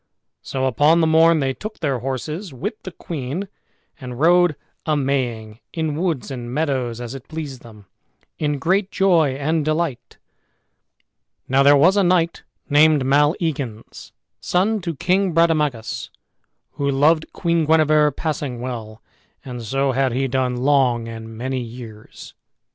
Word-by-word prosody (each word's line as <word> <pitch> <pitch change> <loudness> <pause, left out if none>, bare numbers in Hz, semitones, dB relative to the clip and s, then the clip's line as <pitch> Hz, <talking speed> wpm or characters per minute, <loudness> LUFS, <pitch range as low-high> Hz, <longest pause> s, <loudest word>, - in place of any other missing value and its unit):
So 130 -1 -3
upon 145 +6 +3
the 165 - +3
morn 160 0 +4
they 135 -1 0
took 215 +9 -8
their 140 -6 -1
horses 150 - -4
with 135 - -4
the 185 - -8
queen, 160 +4 -5 0.5
and 125 -2 -8
rode 175 0 +4 0.3
a 155 -1 0
maying 120 -6 -2
in 160 -3 -2
woods 160 -5 -2
and 120 -2 -6
meadows, 130 -5 -1
as 120 0 -6
it 135 -2 -10
pleased 150 -5 -6
them, 105 -3 -15 0.5
in 145 -1 0
great 185 +6 +1
joy 170 -10 +2
and 155 +3 0
delight. 155 -3 -2 1.3
Now 135 +1 +3
there 140 +1 +6
was 180 +8 +4
a 200 - +4
knight 175 -2 +1 0.3
named 150 -1 +4
Maleagans, 145 - -1 0.3
son 205 +4 0
to 170 -2 -4
King 185 +5 +1
Brademagus, 150 -8 +1 0.6
who 140 0 -2
loved 155 +4 +2
Queen 170 -2 0
Guenever 155 -1 +4
passing 145 -4 -4
well, 115 -3 -6 0.4
and 125 -2 -6
so 135 +5 0
had 130 -1 0
he 135 +2 0
done 130 -1 -1
long 125 -3 +2
and 115 -1 -8
many 130 +2 -2
years. 115 -2 -10
145 Hz, 140 wpm, -21 LUFS, 125-160 Hz, 1.3 s, there